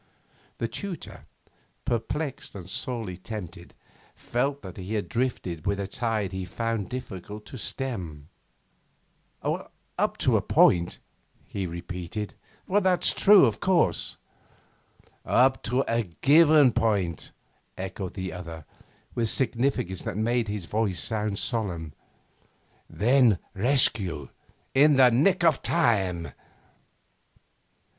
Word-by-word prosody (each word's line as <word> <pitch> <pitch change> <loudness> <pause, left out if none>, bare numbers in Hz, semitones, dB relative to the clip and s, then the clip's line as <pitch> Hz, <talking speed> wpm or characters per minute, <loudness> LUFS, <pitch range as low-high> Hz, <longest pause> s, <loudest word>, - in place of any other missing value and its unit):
The 115 - -1
tutor, 180 - -7 0.6
perplexed 125 +5 -3
and 90 -3 -8
sorely 110 -3 -3
tempted, 100 -2 -8 0.4
felt 140 +3 -2
that 95 -2 -9
he 100 +3 -2
drifted 105 -9 -3
with 100 0 0
a 100 - -2
tide 110 -2 -2
he 95 0 -4
found 115 +2 -3
it - - -17
difficult 105 -4 -7
to 130 - -9
stem. 90 - -4 1.2
'Up - - -3
to - - +3
a - - 0
point,' 85 0 +3 0.5
he 95 -2 -4
repeated. 90 +4 -6 0.3
'That's 185 -2 +3
true, 200 -5 +7
of 115 -3 -1
course.' 185 -3 +1 1.1
'Up 130 +1 +3
to 125 +4 0
a 115 +1 +1
given 145 - +5
point,' 100 -8 0 0.5
echoed 95 0 -5
the 95 -2 -4
other, 85 -3 -8 0.5
with 115 -2 0
significance 120 -8 0
that - - -4
made 115 +1 +1
his 105 -3 -4
voice 100 -2 -1
sound 105 +4 -1
solemn. 90 - -2 1.0
'Then 120 -1 +4 0.2
rescue 100 - +3 0.4
in 145 +2 +6
the 130 -2 +6
nick 170 +10 +3
of 160 -5 +4
time. 95 - +1
110 Hz, 110 wpm, -26 LUFS, 95-130 Hz, 1.2 s, true